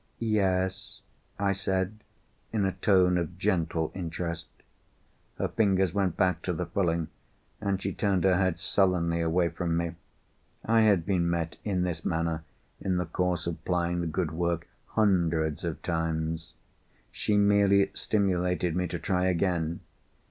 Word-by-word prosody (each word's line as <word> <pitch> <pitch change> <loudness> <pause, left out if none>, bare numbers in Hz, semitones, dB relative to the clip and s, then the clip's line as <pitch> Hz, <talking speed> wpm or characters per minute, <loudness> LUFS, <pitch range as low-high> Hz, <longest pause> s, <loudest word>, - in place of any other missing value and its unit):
"Yes?" 100 -2 0 0.4
I 100 0 +1
said, 95 +2 -1 0.5
in 105 -3 +1
a 95 - +1
tone 90 -2 +3
of 85 +1 -4
gentle 80 -3 0
interest. 85 -2 -4 0.9
Her - - 0
fingers 95 -5 +2
went 95 -4 0
back 90 -1 +2
to 90 - -2
the 90 +2 -2
frilling, 85 -2 0 0.5
and 100 -2 0
she - - -3
turned 95 -4 +1
her 95 -2 +4
head 95 -3 +1
sullenly 90 -2 +1
away 85 +1 +2
from 85 +1 -1
me. 85 0 -1 0.7
I 115 0 +4
had 100 -6 +4
been 90 -3 +1
met 85 -1 -2
in 95 -4 0
this 85 -2 -3
manner, 80 -1 -1 0.4
in 95 -2 0
the 90 - 0
course 90 +1 -1
of 80 -2 -4
plying 85 -1 0
the 85 - -2
good 80 +1 -1
work, 85 0 -1 0.2
hundreds 85 -7 +1
of - - -4
times. 80 0 -2 0.6
She 105 - 0
merely 100 -1 +4
stimulated 90 -4 0
me 90 0 0
to 85 +1 -4
try 90 +2 0
again. 85 -2 0
90 Hz, 150 wpm, -28 LUFS, 85-95 Hz, 0.9 s, her